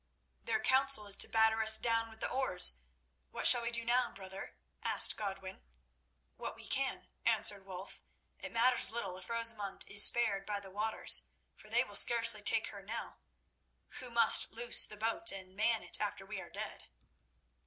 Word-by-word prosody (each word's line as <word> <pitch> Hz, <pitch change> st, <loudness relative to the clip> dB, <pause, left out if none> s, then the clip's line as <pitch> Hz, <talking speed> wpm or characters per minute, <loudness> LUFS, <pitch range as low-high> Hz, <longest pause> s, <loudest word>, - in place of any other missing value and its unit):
"Their 225 Hz, -1 st, -3 dB
counsel 265 Hz, -4 st, +2 dB
is 200 Hz, -1 st, +4 dB
to -, -, +3 dB
batter 220 Hz, 0 st, 0 dB
us 220 Hz, 0 st, +4 dB
down 230 Hz, -1 st, -2 dB
with 220 Hz, 0 st, -17 dB
the -, -, -2 dB
oars. 185 Hz, -, +1 dB, 0.5 s
What -, -, -8 dB
shall 245 Hz, -, +8 dB
we 235 Hz, -, -4 dB
do 235 Hz, -1 st, 0 dB
now, 245 Hz, +1 st, -1 dB
brother?" 190 Hz, 0 st, -10 dB, 0.3 s
asked -, -, +3 dB
Godwin. 195 Hz, -2 st, -8 dB, 0.8 s
"What -, -, -8 dB
we -, -, -12 dB
can," -, -, -3 dB, 0.2 s
answered 195 Hz, -1 st, 0 dB
Wulf. 190 Hz, +1 st, -10 dB, 0.4 s
"It -, -, -9 dB
matters 245 Hz, +2 st, +2 dB
little 205 Hz, -5 st, -5 dB
if 185 Hz, -, -12 dB
Rosamund 230 Hz, -4 st, -2 dB
is 205 Hz, 0 st, +7 dB
spared 220 Hz, -5 st, +6 dB
by 205 Hz, -1 st, -4 dB
the 195 Hz, -1 st, -13 dB
waters, 215 Hz, +3 st, 0 dB, 0.3 s
for -, -, -16 dB
they -, -, 0 dB
will -, -, -14 dB
scarcely 230 Hz, -2 st, +3 dB
take 225 Hz, +2 st, 0 dB
her 200 Hz, -2 st, -12 dB
now, 215 Hz, +4 st, -9 dB, 0.8 s
who 255 Hz, -, -6 dB
must 235 Hz, -1 st, +3 dB
loose 235 Hz, +1 st, 0 dB
the 210 Hz, -, -9 dB
boat 225 Hz, +10 st, -1 dB
and 190 Hz, -1 st, -11 dB
man 220 Hz, +2 st, -1 dB
it -, -, 0 dB
after 205 Hz, -2 st, -6 dB
we 195 Hz, -1 st, -9 dB
are 175 Hz, -, -14 dB
dead." -, -, -9 dB
220 Hz, 175 wpm, -31 LUFS, 195-235 Hz, 0.8 s, shall